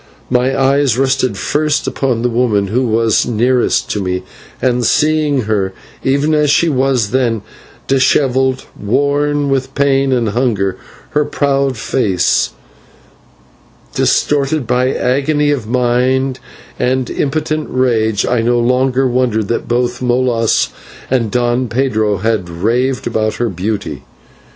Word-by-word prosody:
My 125 Hz, +1 st, +1 dB
eyes 135 Hz, -2 st, +2 dB
rested 130 Hz, -5 st, +1 dB
first 150 Hz, +8 st, 0 dB
upon 125 Hz, -4 st, -1 dB
the 125 Hz, -, +2 dB
woman, 115 Hz, -5 st, +1 dB
who 125 Hz, +4 st, 0 dB
was 115 Hz, 0 st, +2 dB
nearest 120 Hz, +2 st, +1 dB
to 105 Hz, -, -2 dB
me, 90 Hz, -1 st, -2 dB, 0.4 s
and 125 Hz, -1 st, +1 dB
seeing 150 Hz, 0 st, +2 dB
her, 100 Hz, -4 st, -1 dB, 0.3 s
even 140 Hz, +3 st, +1 dB
as 150 Hz, -1 st, +2 dB
she 165 Hz, +3 st, +3 dB
was 130 Hz, -6 st, +1 dB
then, 120 Hz, -4 st, 0 dB, 0.4 s
dishevelled, 130 Hz, 0 st, +1 dB
worn 145 Hz, +5 st, 0 dB
with 135 Hz, 0 st, -1 dB
pain 135 Hz, -1 st, +2 dB
and 120 Hz, -4 st, +1 dB
hunger, 105 Hz, -4 st, 0 dB, 0.4 s
her 150 Hz, -, +2 dB
proud 140 Hz, -3 st, 0 dB
face 105 Hz, -6 st, +1 dB, 1.4 s
distorted 145 Hz, -1 st, +1 dB
by 125 Hz, +2 st, +1 dB
agony 145 Hz, +4 st, +1 dB
of 125 Hz, -7 st, -2 dB
mind 125 Hz, +2 st, +1 dB, 0.4 s
and 130 Hz, 0 st, 0 dB
impotent 155 Hz, +1 st, -2 dB
rage, 110 Hz, -5 st, +1 dB
I 125 Hz, -2 st, +1 dB
no 120 Hz, +1 st, +1 dB
longer 130 Hz, +2 st, +2 dB
wondered 120 Hz, -4 st, 0 dB
that 115 Hz, -, -2 dB
both 120 Hz, +1 st, -1 dB
Molas 120 Hz, -2 st, +1 dB, 0.4 s
and 120 Hz, -4 st, +1 dB
Don 120 Hz, +2 st, 0 dB
Pedro 110 Hz, -4 st, 0 dB
had 105 Hz, -3 st, -1 dB
raved 120 Hz, +10 st, -1 dB
about 110 Hz, -2 st, -1 dB
her 120 Hz, -1 st, -1 dB
beauty. 95 Hz, -6 st, -4 dB
125 Hz, 125 wpm, -15 LUFS, 115-135 Hz, 1.4 s, she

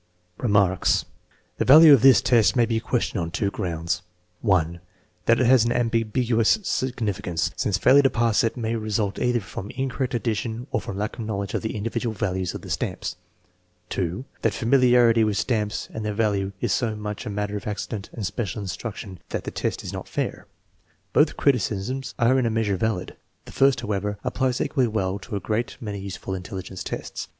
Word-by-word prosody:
Remarks. 100 Hz, -5 st, +2 dB, 0.5 s
The -, -, +3 dB
value 155 Hz, +3 st, +9 dB
of 135 Hz, -, +6 dB
this 135 Hz, +1 st, +7 dB
test 115 Hz, -2 st, +4 dB
may 120 Hz, -2 st, +4 dB
be 115 Hz, -1 st, 0 dB
questioned 115 Hz, -4 st, -1 dB
on 85 Hz, -, -3 dB
two 100 Hz, +4 st, -1 dB
grounds: 90 Hz, -2 st, -2 dB, 0.4 s
(1) 85 Hz, -5 st, +1 dB, 0.5 s
That 115 Hz, -, +5 dB
it 130 Hz, -, +3 dB
has 125 Hz, -1 st, +6 dB
an 120 Hz, -, 0 dB
ambiguous 115 Hz, -, +2 dB
significance, 100 Hz, -, -1 dB
since 100 Hz, -4 st, 0 dB
failure 130 Hz, +8 st, +6 dB
to 135 Hz, -, +4 dB
pass 115 Hz, -3 st, +2 dB
it 115 Hz, -, -1 dB
may 115 Hz, -1 st, -1 dB
result 110 Hz, -2 st, -1 dB
either 125 Hz, -1 st, +2 dB
from 95 Hz, +1 st, -7 dB
incorrect 130 Hz, -1 st, -2 dB
addition 115 Hz, 0 st, -2 dB
or -, -, 0 dB
from 100 Hz, -, -6 dB
lack 105 Hz, +3 st, -3 dB
of 115 Hz, -, -3 dB
knowledge 100 Hz, -2 st, -3 dB
of -, -, -1 dB
the 110 Hz, -, -4 dB
individual 115 Hz, +1 st, -2 dB
values 95 Hz, -2 st, -2 dB
of -, -, -6 dB
the -, -, -8 dB
stamps; -, -, -3 dB, 0.8 s
() 95 Hz, +8 st, -4 dB
that -, -, +1 dB
familiarity 120 Hz, -2 st, +4 dB
with 105 Hz, -2 st, 0 dB
stamps 105 Hz, -3 st, -1 dB
and 110 Hz, -, -4 dB
their 105 Hz, -1 st, -2 dB
values 100 Hz, -3 st, 0 dB
is -, -, 0 dB
so 115 Hz, -3 st, 0 dB
much 105 Hz, +2 st, -5 dB
a -, -, -2 dB
matter 105 Hz, 0 st, -3 dB
of 105 Hz, -, -5 dB
accident 105 Hz, 0 st, -4 dB
and 110 Hz, -, -5 dB
special 105 Hz, +1 st, -3 dB
instruc 100 Hz, +3 st, -5 dB
tion 95 Hz, -4 st, -9 dB
that -, -, -3 dB
the -, -, -5 dB
test -, -, -3 dB
is -, -, -6 dB
not -, -, -6 dB
fair. -, -, -3 dB, 0.7 s
Both -, -, +3 dB
criticisms 125 Hz, 0 st, 0 dB
are 125 Hz, +3 st, +3 dB
in 125 Hz, -, +1 dB
a -, -, +1 dB
measure 110 Hz, -3 st, 0 dB
valid. 95 Hz, -2 st, -2 dB, 0.3 s
The -, -, -11 dB
first, 135 Hz, -1 st, +3 dB
how 105 Hz, -, -4 dB
ever, 105 Hz, +1 st, -2 dB
applies 130 Hz, -2 st, 0 dB
equally 130 Hz, -4 st, +1 dB
well 100 Hz, -3 st, -1 dB
to 105 Hz, +2 st, -7 dB
a -, -, -1 dB
great 110 Hz, +5 st, -2 dB
many 105 Hz, -3 st, -5 dB
useful 95 Hz, 0 st, -6 dB
intelli 95 Hz, +1 st, -5 dB
gence 95 Hz, 0 st, -7 dB
tests. -, -, -5 dB
110 Hz, 195 wpm, -24 LUFS, 100-120 Hz, 0.8 s, value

